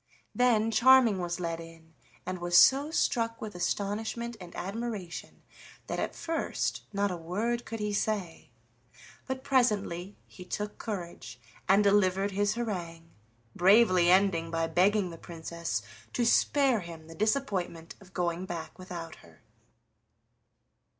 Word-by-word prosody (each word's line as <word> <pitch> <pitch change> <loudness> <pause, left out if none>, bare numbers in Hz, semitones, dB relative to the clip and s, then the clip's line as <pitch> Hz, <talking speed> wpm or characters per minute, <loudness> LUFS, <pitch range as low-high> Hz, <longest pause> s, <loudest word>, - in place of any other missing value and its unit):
Then 225 -3 +3
Charming 240 -3 +6
was 175 0 -3
led 165 -1 -3
in, 165 -1 -13 0.3
and 185 0 -4
was 175 0 +2
so 275 +8 +6
struck 230 -7 0
with 215 -1 -6
astonishment 210 +6 -2
and 175 -1 -10
admiration 200 -2 -5 0.4
that - - -3
at - - -3
first 330 -1 -2
not 200 -1 0
a - - -2
word 210 +9 -2
could 225 - -6
he 210 0 -2
say. 200 -8 -2 0.8
But 260 0 -4
presently 210 -8 0
he 180 - -12
took 210 +3 -5
courage 170 - -6 0.3
and 200 +2 +6
delivered 200 -1 +3
his 205 +2 0
harangue, 170 -8 -5 0.4
bravely 185 -2 +5
ending 180 -3 +3
by 165 0 0
begging 185 +3 +2
the 165 - -10
Princess 165 -8 -5 0.3
to 240 - +1
spare 265 +1 +3
him 170 -3 -9
the 165 - -11
disappointment 190 -6 -1
of 190 -1 -16
going 175 0 -2
back 170 0 -6
without 170 -3 -7
her. 85 -2 -19
195 Hz, 135 wpm, -29 LUFS, 170-220 Hz, 0.8 s, Charming